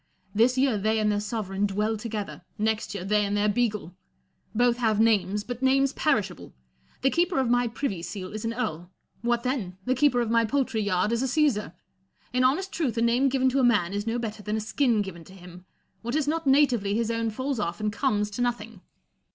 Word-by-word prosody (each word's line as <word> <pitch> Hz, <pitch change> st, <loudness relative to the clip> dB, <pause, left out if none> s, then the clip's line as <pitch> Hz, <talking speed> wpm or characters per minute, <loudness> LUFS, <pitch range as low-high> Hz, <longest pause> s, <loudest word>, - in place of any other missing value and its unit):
This 240 Hz, +4 st, +3 dB
year 260 Hz, -5 st, +2 dB
they 220 Hz, +2 st, +1 dB
and 215 Hz, -1 st, +2 dB
their 205 Hz, -, 0 dB
sovereign 205 Hz, -2 st, -2 dB
dwell 210 Hz, +3 st, -1 dB
together; 210 Hz, -2 st, -5 dB, 0.2 s
next 220 Hz, 0 st, -1 dB
year, 185 Hz, -2 st, -5 dB
they 210 Hz, +1 st, +2 dB
and 205 Hz, 0 st, -1 dB
their 205 Hz, +1 st, +2 dB
beagle. 210 Hz, -5 st, -1 dB, 0.6 s
Both 240 Hz, +1 st, +3 dB
have 220 Hz, -4 st, +1 dB
names, 210 Hz, -2 st, +2 dB
but 245 Hz, +2 st, -6 dB
names 270 Hz, +1 st, +3 dB
perishable. 205 Hz, -, -1 dB, 0.5 s
The 270 Hz, -, +4 dB
keeper 345 Hz, -1 st, +1 dB
of 260 Hz, -3 st, +2 dB
my 245 Hz, 0 st, +3 dB
privy 225 Hz, -6 st, -3 dB
seal 185 Hz, +2 st, -6 dB
is 215 Hz, -, -5 dB
an 225 Hz, -, -1 dB
earl: 175 Hz, -8 st, -3 dB, 0.3 s
what 240 Hz, 0 st, 0 dB
then 255 Hz, +1 st, 0 dB
1 180 Hz, -1 st, -9 dB
the 255 Hz, -, +2 dB
keeper 260 Hz, -1 st, +3 dB
of 235 Hz, -2 st, 0 dB
my 230 Hz, 0 st, +4 dB
poultry 255 Hz, -1 st, 0 dB
yard 205 Hz, +1 st, +1 dB
is 235 Hz, 0 st, 0 dB
a 265 Hz, -, 0 dB
Caesar. 260 Hz, -, +1 dB, 0.6 s
In 255 Hz, 0 st, +2 dB
honest 330 Hz, +10 st, +1 dB
truth, 265 Hz, -9 st, -2 dB
a -, -, +1 dB
name 245 Hz, +4 st, +3 dB
given 260 Hz, 0 st, +1 dB
to 270 Hz, +2 st, +1 dB
a -, -, +3 dB
man 205 Hz, -7 st, +3 dB
is 205 Hz, +2 st, -3 dB
no 230 Hz, +1 st, 0 dB
better 220 Hz, -3 st, -4 dB
than 210 Hz, +1 st, -2 dB
a -, -, -1 dB
skin 220 Hz, 0 st, +1 dB
given 170 Hz, -4 st, -9 dB
to 190 Hz, -, -14 dB
him; 180 Hz, -1 st, -13 dB, 0.4 s
what 235 Hz, +3 st, -3 dB
is 305 Hz, -2 st, 0 dB
not 320 Hz, 0 st, -1 dB
natively 250 Hz, -8 st, +3 dB
his 230 Hz, 0 st, 0 dB
own 230 Hz, 0 st, -1 dB
falls 260 Hz, +3 st, -3 dB
off 170 Hz, -4 st, -2 dB
and 210 Hz, -1 st, -1 dB
comes 210 Hz, -4 st, 0 dB
to 210 Hz, -, -4 dB
nothing. 235 Hz, -4 st, -3 dB
225 Hz, 220 wpm, -26 LUFS, 205-255 Hz, 0.6 s, The